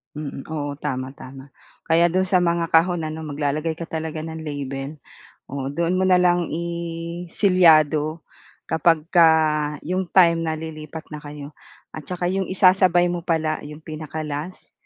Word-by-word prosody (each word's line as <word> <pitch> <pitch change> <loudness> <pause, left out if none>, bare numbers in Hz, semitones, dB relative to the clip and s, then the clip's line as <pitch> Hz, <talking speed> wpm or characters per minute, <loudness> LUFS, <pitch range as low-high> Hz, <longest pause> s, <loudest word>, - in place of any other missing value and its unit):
Mm. 145 -2 -6
Oo, 145 -2 -4
tama, 130 -3 -3
tama. 135 +1 -11 0.4
Kaya 165 +1 +5
do'n 185 +2 +2
sa 185 - +4
mga 170 -1 +1
kahon 170 +1 +3
ano 155 0 -5
maglalagay 150 +2 -2
ka 165 +1 -8
talaga 160 -1 -4
ng 160 0 -7
label. 140 0 -5 0.5
Oo, 135 -1 -3
doon 170 +5 0
mo 190 - +2
na 185 - +6
lang 175 -1 +2
i-selyado 170 -2 +1 0.4
kapagka 165 +1 +4 0.6
'yong 185 +1 -2
time 170 -2 +5
na 160 -1 -2
lilipat 160 0 -8
na 150 - -6
kayo 145 0 -9 0.4
at 150 -3 -9
tsaka 180 -1 -3
'yong 190 0 -1
isasabay 185 -2 +4
mo 175 - -3
pala 160 -2 -1
'yong 150 +1 -11
pinaka-last, 155 +1 -6
160 Hz, 145 wpm, -22 LUFS, 150-175 Hz, 0.6 s, na